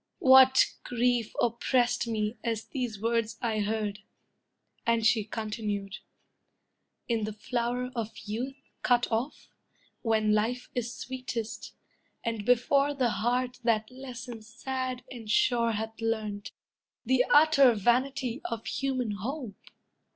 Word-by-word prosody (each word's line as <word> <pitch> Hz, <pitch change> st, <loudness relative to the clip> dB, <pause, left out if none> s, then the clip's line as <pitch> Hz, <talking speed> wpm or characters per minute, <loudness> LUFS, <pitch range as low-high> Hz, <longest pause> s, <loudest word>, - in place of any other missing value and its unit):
What 260 Hz, 0 st, +7 dB
grief 245 Hz, -2 st, 0 dB
oppressed 240 Hz, +1 st, +1 dB
me, 215 Hz, 0 st, -1 dB
as 230 Hz, -2 st, -2 dB
these 245 Hz, -7 st, -4 dB
words 230 Hz, 0 st, 0 dB
I 225 Hz, -3 st, -1 dB
heard! 210 Hz, -1 st, -1 dB, 0.8 s
And 230 Hz, -2 st, +2 dB
she 220 Hz, -1 st, +4 dB
continued: 210 Hz, -2 st, -4 dB, 1.1 s
"In 230 Hz, -2 st, 0 dB
the 215 Hz, -, -4 dB
flower 245 Hz, +3 st, -2 dB
of 225 Hz, -2 st, -4 dB
youth 240 Hz, +6 st, -4 dB, 0.3 s
Cut 245 Hz, -1 st, +3 dB
off, 235 Hz, +6 st, -2 dB, 0.5 s
when 220 Hz, -2 st, +2 dB
life 230 Hz, +4 st, 0 dB
is 240 Hz, -1 st, -2 dB
sweetest, 255 Hz, -3 st, -5 dB, 0.5 s
and 225 Hz, -3 st, -3 dB
before 275 Hz, +4 st, +3 dB
The 250 Hz, -4 st, +1 dB
heart 245 Hz, +3 st, -1 dB
that 220 Hz, -1 st, +1 dB
lesson 250 Hz, -3 st, -8 dB
sad 255 Hz, +2 st, -4 dB
and 230 Hz, -4 st, -9 dB
sure 235 Hz, +1 st, +3 dB
hath 220 Hz, +1 st, -5 dB
learnt, 215 Hz, -2 st, -2 dB, 0.5 s
The 255 Hz, +1 st, +4 dB
utter 290 Hz, -5 st, +6 dB
vanity 250 Hz, +3 st, +1 dB
of 230 Hz, -9 st, -4 dB
human 255 Hz, -4 st, -1 dB
hope! 250 Hz, 0 st, -4 dB
235 Hz, 120 wpm, -29 LUFS, 220-255 Hz, 1.1 s, What